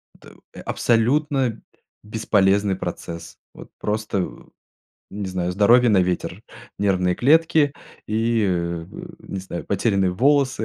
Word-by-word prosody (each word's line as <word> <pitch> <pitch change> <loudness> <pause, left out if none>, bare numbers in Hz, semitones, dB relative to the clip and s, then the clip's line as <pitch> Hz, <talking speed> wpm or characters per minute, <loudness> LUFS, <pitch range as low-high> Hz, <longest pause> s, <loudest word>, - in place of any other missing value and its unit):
Это - - -17 0.3
абсолютно 130 +1 +1 0.4
бесполезный 100 -2 +1
процесс. 85 -2 -7 0.2
Вот - - -12
просто, 105 -3 -2 0.8
не 100 0 -5
знаю, 90 -1 -2
здоровье 120 +6 +5
на 100 - +4
ветер, 90 0 -3 0.4
нервные 95 -3 +1
клетки 150 - +3 0.4
и, 115 +1 +1
э, 85 -2 -2 0.3
не 95 - -6
знаю, 95 -2 -6
потерянные 100 -2 +1
волосы, 130 +3 +2
105 Hz, 105 wpm, -22 LUFS, 90-120 Hz, 0.8 s, здоровье